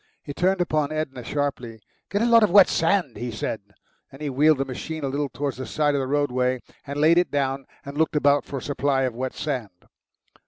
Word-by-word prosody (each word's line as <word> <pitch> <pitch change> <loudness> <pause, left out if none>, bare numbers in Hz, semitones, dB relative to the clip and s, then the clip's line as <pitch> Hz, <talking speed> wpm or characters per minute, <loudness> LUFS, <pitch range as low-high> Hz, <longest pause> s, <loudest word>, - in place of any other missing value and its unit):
He 145 - -7
turned 185 +4 +1
upon 155 -4 0
Edna 140 -5 -4
sharply. 125 -4 -3 0.3
"Get 205 +2 0
a - - +3
lot 230 -1 +6
of 215 - +4
wet 195 +1 +7
sand," 165 -5 +1
he 120 - -4
said. 110 -1 -4 0.5
Then 135 - -13
he 150 -2 -3
wheeled 150 +3 +4
the 135 - -1
machine 155 +4 -6
a - - 0
little 140 +1 -2
towards 140 -1 -4
the 130 - -6
side 150 -1 +1
of 140 - +1
the 130 - -3
roadway, 130 -3 0 0.2
and 140 +1 -4
laid 165 +3 +5
it 180 - 0
down 135 -1 -1 0.2
and 140 0 -7
looked 160 -1 +1
about 145 -1 +3
for 140 - -6
a - - -5
supply 140 -1 0
of 130 -2 -1
wet 130 +2 -4
sand. 115 -11 -5
145 Hz, 225 wpm, -24 LUFS, 130-155 Hz, 0.5 s, wet